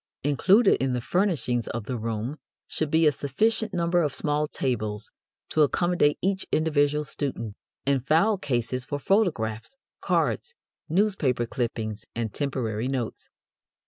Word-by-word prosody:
Included 190 - +4
in 135 -1 +1
the 125 - 0
furnishings 130 - 0
of 120 -1 -4
the 125 - -3
room 115 +4 -3 0.3
should 155 - -2
be 160 +2 +4
a 150 - +6
sufficient 215 - 0
number 175 -1 +2
of 145 -4 -1
small 150 0 0
tables 110 -7 -3 0.4
to 155 - +2
accommodate 160 0 +3
each 190 0 0
individual 150 -1 +2
student, 130 -7 -4 0.3
and 135 -2 +1
file 175 +9 +3
cases 125 -3 -1
for 145 +3 -3
photographs, 145 - 0 0.3
cards, 480 0 0 0.3
newspaper 165 - +1
clippings, 115 -2 -3
and 115 -3 -2
temporary 125 -5 -2
notes. 130 -4 -3
145 Hz, 135 wpm, -26 LUFS, 120-170 Hz, 0.4 s, a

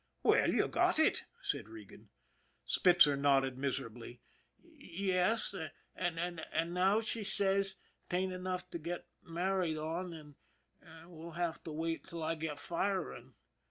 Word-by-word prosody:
" - - -44
Well, - - +4
you - - +2
got - - +2
it," - - +3 0.2
said 110 - -2
Regan. 110 -3 -12 0.6
Spitzer 175 -5 +5
nodded 135 -2 +3
miserably. 120 -3 -4 0.2
;< - - -42 0.4
Yes, 195 +3 +2 0.4
an' 170 -1 -2
now 190 +4 +3
she 225 0 0
says 195 -1 +4 0.3
'tain't 185 +1 0
enough 185 0 -3
to 170 - -4
get 170 +2 -5 0.2
married 175 -1 -1
on, 165 +4 -3
an' 150 -3 -11 0.5
an' 165 +1 -14
we'll 165 0 -9
have 170 0 -2
to 160 - -5
wait 165 +1 -3
till 165 -1 -6
I 160 +1 0
get 160 -2 -4
firing." 180 +4 -3
170 Hz, 140 wpm, -34 LUFS, 155-185 Hz, 0.6 s, Spitzer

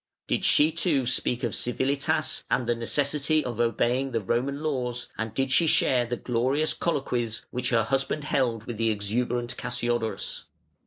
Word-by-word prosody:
Did - - -1
she 150 +2 +5
too 155 -5 +1
speak 125 0 0
of 120 - -1
civilitas 135 +3 0
and 125 - +1
the 120 - +2
necessity 145 +5 0
of 120 -2 -4
obeying 120 +3 +1
the 115 - +1
Roman 130 +8 -1
laws, 125 -5 -2
and 110 0 -3
did 135 +4 -1
she 160 +6 +4
share 125 -5 +3
the 120 0 -2
"glorious 130 +7 0
colloquies" 125 -8 -2
which 125 0 -2
her 115 -2 +3
husband 135 +5 -1
held 125 -7 0
with 115 -2 -6
the 115 0 +2
exuberant 120 +3 -1
Cassiodorus? 120 -2 -2
125 Hz, 160 wpm, -26 LUFS, 120-140 Hz, -, she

